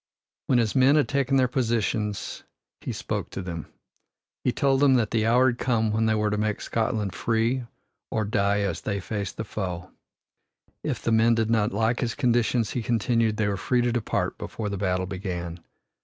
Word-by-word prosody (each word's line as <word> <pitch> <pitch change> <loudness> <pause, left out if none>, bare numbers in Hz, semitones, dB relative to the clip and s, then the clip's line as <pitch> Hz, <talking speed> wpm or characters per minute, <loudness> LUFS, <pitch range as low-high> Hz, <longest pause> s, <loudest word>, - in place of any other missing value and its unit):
When 130 - +3
his 115 -3 +1
men 135 +2 +5
had 150 - +3
taken 135 -1 +1
their 130 -1 +4
positions 115 -4 -1 0.4
he - - -5
spoke - - -3
to - - -5
them. 85 -3 -5 0.8
He 125 - +2
told 135 +1 +2
them 140 -2 +5
that 115 -4 +1
the 110 -1 +1
hour 125 +3 +5
had 120 - -4
come 110 -4 +1
when 110 +1 +1
they 110 - +2
were 105 -1 +1
to 105 - 0
make 105 -1 0
Scotland 110 -4 -1
free 115 +5 0 0.4
or 110 -1 -1
die 100 0 +1
as 95 -5 -2
they 100 -1 -2
faced 100 0 -4
the - - -2
foe. 90 -4 -5 0.9
If - - -3
the 115 - +1
men 115 +1 +4
did 115 0 0
not 110 -2 +2
like 110 +4 +1
his 120 -1 -1
conditions, 120 -4 +1
he 125 - -2
continued, 115 -1 +1
they 110 -2 +1
were 100 -1 -1
free 125 +6 +1
to 120 0 +1
depart 120 -2 -1
before 105 -2 -4
the 100 - -3
battle 95 -1 0
began. 90 -3 -5
110 Hz, 195 wpm, -26 LUFS, 100-120 Hz, 0.9 s, men